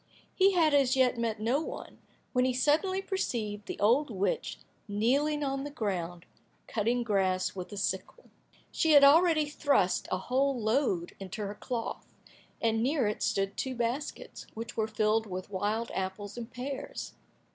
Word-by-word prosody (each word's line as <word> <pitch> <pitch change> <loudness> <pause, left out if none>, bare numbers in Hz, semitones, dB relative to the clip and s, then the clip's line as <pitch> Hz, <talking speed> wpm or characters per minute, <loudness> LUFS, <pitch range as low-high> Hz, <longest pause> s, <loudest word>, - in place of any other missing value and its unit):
He 390 0 +4
had 320 -4 +4
as 270 -3 +4
yet 255 -2 +3
met 225 -2 -1
no 240 +7 +1
one, - - -7 0.3
when 250 -1 +3
he 255 0 +2
suddenly 350 +9 +2
perceived 215 - -3
the - - -5
old 245 +8 +3
witch 210 - -1 0.3
kneeling 275 +9 +1
on 275 -1 -1
the 290 - -4
ground 180 -9 -3 0.4
cutting 235 +3 0
grass 190 -4 +1
with 185 +1 -6
a 205 - -7
sickle. - - -3 0.4
She 320 -1 +2
had 285 -1 +8
already 315 +2 +6
thrust 285 - +1
a 185 - +1
whole 260 +6 0
load 215 -6 0
into 195 +3 -5
her 200 - -4
cloth, 230 +2 -5 0.5
and 225 -1 +1
near 270 +1 +1
it 210 0 -2
stood 195 0 0
two 260 -1 -3
baskets, 240 +5 -4
which 225 +1 -6
were 220 -1 0
filled 220 0 +1
with 185 +1 -6
wild 210 +4 -1
apples 190 +2 -4
and 240 -1 -6
pears. 260 +3 -5
235 Hz, 160 wpm, -30 LUFS, 205-280 Hz, 0.5 s, had